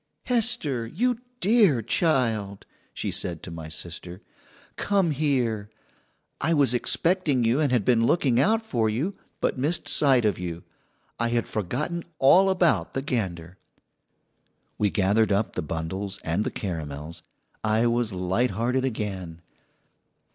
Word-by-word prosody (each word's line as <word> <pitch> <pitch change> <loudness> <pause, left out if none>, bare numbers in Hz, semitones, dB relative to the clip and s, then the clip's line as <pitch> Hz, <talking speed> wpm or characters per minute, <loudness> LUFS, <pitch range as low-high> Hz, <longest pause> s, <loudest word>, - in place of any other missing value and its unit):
"Hester, 210 - +1
you 235 - 0 0.2
dear 195 - +4
child," 110 - 0 0.3
she - - -3
said 85 -3 -4
to 85 - -7
my 80 -1 -7
sister, 85 +3 -7 0.5
"come 195 -5 +1
here. 125 -8 0 0.7
I 160 +3 +2
was 140 -5 +3
expecting 150 +1 +1
you, 115 +5 +2
and 145 -4 +1
had 120 -6 +2
been 115 -2 +3
looking 130 -8 +2
out 220 - +2
for 115 - 0
you, 140 - -1 0.3
but - - 0
missed 150 +7 -1
sight 135 -5 +4
of 100 -5 +1
you. 85 -1 -5 0.6
I 120 - +1
had 120 0 0
forgotten 135 - -3 0.2
all 185 +9 +6
about 180 -3 +2
the 135 - -2
gander." 95 - -3 1.2
We 105 - +3
gathered 100 +2 +2
up 100 +2 +1
the - - -2
bundles 85 +5 -4
and 85 +6 0
the - - -1
caramels. 80 -4 -6 0.4
I 110 +2 +2
was 120 -1 +1
light 95 +7 0
hearted 120 +6 0
again. 95 -9 -4
115 Hz, 140 wpm, -25 LUFS, 95-145 Hz, 1.2 s, all